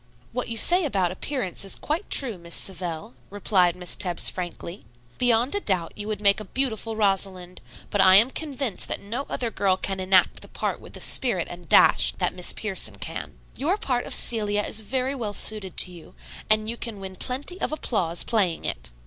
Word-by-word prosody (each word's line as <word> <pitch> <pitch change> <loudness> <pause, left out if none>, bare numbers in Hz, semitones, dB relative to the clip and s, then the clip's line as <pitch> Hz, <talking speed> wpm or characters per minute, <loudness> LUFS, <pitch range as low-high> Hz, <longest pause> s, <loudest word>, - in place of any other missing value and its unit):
"What 250 - -3
you 230 - -2
say 355 +9 +6
about 195 - 0
appearance 200 -1 -3
is 195 - +1
quite 320 +7 -4
true, 235 -9 +4
Miss 170 0 -4
Savell," 170 -8 -4 0.2
replied 190 -3 +1
Miss 180 -1 -1
Tebbs 175 -2 +3
frankly. 175 0 -7 0.4
"Beyond 245 +1 +2
a 405 - 0
doubt 185 - -1
you 205 0 -4
would 215 -2 -4
make 200 0 +4
a 215 - -8
beautiful 225 -1 -1
Rosalind; 195 -3 -1 0.3
but 205 - +2
I 185 -1 +7
am 225 +6 +6
convinced 275 -8 -2
that - - -1
no 235 +8 -5
other 235 -2 -3
girl 190 -2 +1
can 195 0 -4
enact 185 -1 +2
the - - -9
part - - -4
with - - -14
the - - -8
spirit 215 -10 +2
and 175 -2 -11
dash - - +5
that - - -1
Miss 180 - +1
Pierson 210 -3 -3
can. - - -7 0.2
Your 340 +9 0
part 250 -10 -2
of - - -2
Celia 210 -3 +1
is 215 - +2
very 255 +5 -2
well 225 -6 -4
suited 205 -4 +1
to 180 - +4
you, 170 -2 -14 0.3
and 215 0 +3
you 235 +1 -4
can 230 -4 -6
win 190 -1 -8
plenty 280 - -3
of - - -1
applause 185 - -1
playing 195 -8 -1
it. - - -3
205 Hz, 200 wpm, -24 LUFS, 185-240 Hz, 0.4 s, I